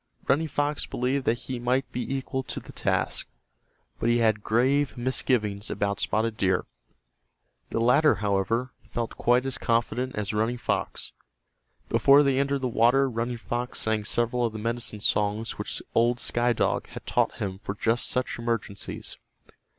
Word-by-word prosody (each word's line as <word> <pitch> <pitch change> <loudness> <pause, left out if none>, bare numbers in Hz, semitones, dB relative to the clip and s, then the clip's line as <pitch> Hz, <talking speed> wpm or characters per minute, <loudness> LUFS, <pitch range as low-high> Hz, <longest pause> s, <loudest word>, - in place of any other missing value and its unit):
Running 155 +4 +3
Fox 145 0 -1
believed 130 +2 -1
that 115 - +2
he 130 -2 -4
might 125 +3 0
be 125 - -3
equal 130 0 -3
to 130 -2 -5
the - - -12
task, - - -1 0.7
but 115 - +1
he 120 - +4
had 110 -3 +2
grave 130 +6 +2
misgivings 115 -5 0
about 100 -1 -1
Spotted 110 +1 0
Deer. 95 -4 +1 1.0
The - - -1
latter, 125 +7 +5
however, 105 +5 0 0.2
felt 120 -1 -3
quite 125 +2 +3
as 130 -2 -2
confident 120 +2 0
as 105 0 -2
Running 110 +3 0
Fox. - - -2 0.7
Before 140 +1 +6
they 135 -1 +2
entered 140 0 0
the 130 - 0
water 125 +4 +4
Running 120 +1 -2
Fox 120 +1 -3
sang 110 -1 0
several 120 +3 0
of 115 -2 0
the - - -5
medicine 115 -1 -3
songs 105 +2 0
which - - -3
old 120 +1 +3
Sky 120 0 +2
Dog 115 - 0
had - - -10
taught - - +1
him 95 -2 -4
for 100 0 -5
just 115 +3 +1
such 125 -1 -1
emergencies. 115 -4 -3
120 Hz, 160 wpm, -27 LUFS, 110-130 Hz, 1.0 s, Before